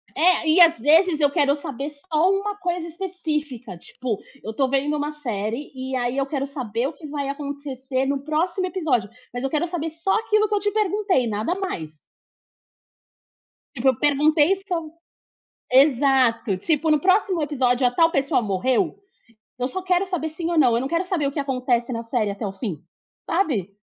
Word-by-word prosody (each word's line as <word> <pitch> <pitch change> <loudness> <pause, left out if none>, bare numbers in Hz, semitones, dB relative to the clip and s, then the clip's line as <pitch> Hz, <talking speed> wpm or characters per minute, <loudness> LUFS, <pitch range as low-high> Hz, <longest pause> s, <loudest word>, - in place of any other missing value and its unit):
É, 345 -1 +4
às 335 -1 +7
vezes 315 +6 +4
eu 285 -1 +3
quero 285 -3 +2
saber 280 0 -5
só 310 +4 0
uma 400 +1 0
coisa 350 -3 -2
específica, 305 - -4
tipo, 230 +3 -5 0.2
eu 220 - -5
tô 265 +2 +1
vendo 280 +2 +1
uma 295 +1 -2
série 235 -2 -4
e 260 0 -5
aí 245 +1 -1
eu 275 - +1
quero 275 -1 -2
saber 255 -3 -3
o 310 - -6
que 300 +1 -11
vai 285 -1 -3
acontecer 280 -2 -3
no 275 0 0
próximo 345 +5 0
episódio, 290 - 0 0.2
mas 245 - -4
eu 270 - 0
quero 310 +4 0
saber 325 -2 -3
só 330 +5 -1
aquilo 430 -1 +2
que - - -1
eu - - +2
te 410 +1 -1
perguntei, 405 - +1
nada 220 - -1
mais. 160 - -5 1.7
Tipo, 265 +3 +2
eu 260 - +2
perguntei 300 +4 +3
so 330 -4 -3 0.8
exato. 260 -6 +4
Tipo, 310 - 0
no 305 - +4
próximo 375 -2 +2
episódio 255 -4 +1
a - - 0
tal 330 +6 +3
pessoa 275 -2 +1
morreu? 255 - 0 0.6
Eu 250 +1 -1
só 375 +7 -5
quero 370 +1 +1
saber 320 -4 -3
sim 330 +2 -4
ou 335 - +1
não, 250 -5 +5
eu 235 - +2
não 265 - -2
quero 340 +3 0
saber 350 -6 -1
o 275 - -1
que 295 - -5
acontece 255 -3 0
na 230 0 -3
série 225 -3 -1
até 200 +1 -4
o 195 - -4
fim, 195 - -5 0.4
sabe? 225 - 0
290 Hz, 185 wpm, -23 LUFS, 255-335 Hz, 1.7 s, às